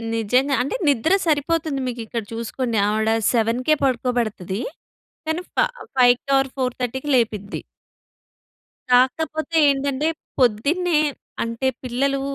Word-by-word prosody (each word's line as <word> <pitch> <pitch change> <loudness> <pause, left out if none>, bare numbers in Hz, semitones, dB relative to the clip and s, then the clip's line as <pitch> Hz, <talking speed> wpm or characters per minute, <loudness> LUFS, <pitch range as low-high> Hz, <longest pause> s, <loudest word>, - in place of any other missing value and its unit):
నిజంగా. 250 +5 +2
అంటే 275 - -3
నిద్ర 280 +6 +2
సరిపోతుంది 305 -1 0
మీకు 240 -1 -4
ఇక్కడ 230 0 -4
చూసుకోండి. 230 +1 -2
ఆవిడ 220 +1 +1 0.2
7కే 240 +6 +2
పడుకోబెడతదీ. 235 -6 -1 0.7
కానీ 320 +2 -1
ఫ - - -29 0.4
ఫైవ్‌కి 245 +1 +4
ఆర్ 270 0 +1
4:30కి 255 +1 -2
లేపిద్ది. 215 -4 -1 1.3
కాకపోతే 315 +6 +2
ఏంటంటే 280 +1 0 0.3
పొద్దున్నే 300 +9 +2 0.4
అంటే 230 +3 -2 0.2
పిల్లలు 270 +2 0
255 Hz, 100 wpm, -22 LUFS, 230-280 Hz, 1.3 s, ఫైవ్‌కి